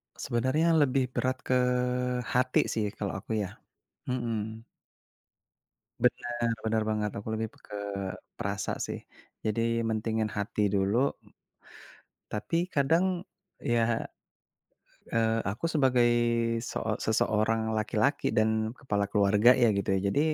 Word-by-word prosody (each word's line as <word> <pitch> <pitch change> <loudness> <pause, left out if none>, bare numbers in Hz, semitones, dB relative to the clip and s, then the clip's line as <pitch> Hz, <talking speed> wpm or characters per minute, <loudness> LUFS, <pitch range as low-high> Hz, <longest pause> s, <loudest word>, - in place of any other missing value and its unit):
Sebenarnya 130 +8 +1
lebih 135 -5 +3
berat 130 0 -1
ke 130 - +2 0.7
hati 125 +2 +1
sih 110 -2 0
kalau 100 -2 -3
aku 110 +3 -4
ya, 100 -2 -3 0.5
mhm. 115 -3 -3 1.4
Benar 120 -1 +1
benar 110 0 0
banget 105 -1 0
aku 100 - -6
lebih 110 0 -1
ke 100 -1 -6 0.5
perasa 100 0 -2
sih, - - -4 0.4
jadi 115 +2 0
mentingin 110 -1 -1
hati 105 0 -1
dulu. 100 +7 +2 1.2
Tapi 110 +10 -1 0.2
kadang, 170 +6 +2 0.4
ya, 120 -1 +2 1.3
eee, 115 0 +2
aku 105 +10 -6
sebagai 130 -6 +3 0.6
seo 110 -2 -2
seseorang 110 0 +1
laki-laki 110 +7 +1
dan 110 0 +1
kepala 105 -6 -1
keluarga 105 +3 +5
ya 120 - +7
gitu 100 - -2
ya 95 - +2
jadi, 140 +9 +1
110 Hz, 110 wpm, -29 LUFS, 105-125 Hz, 1.4 s, ya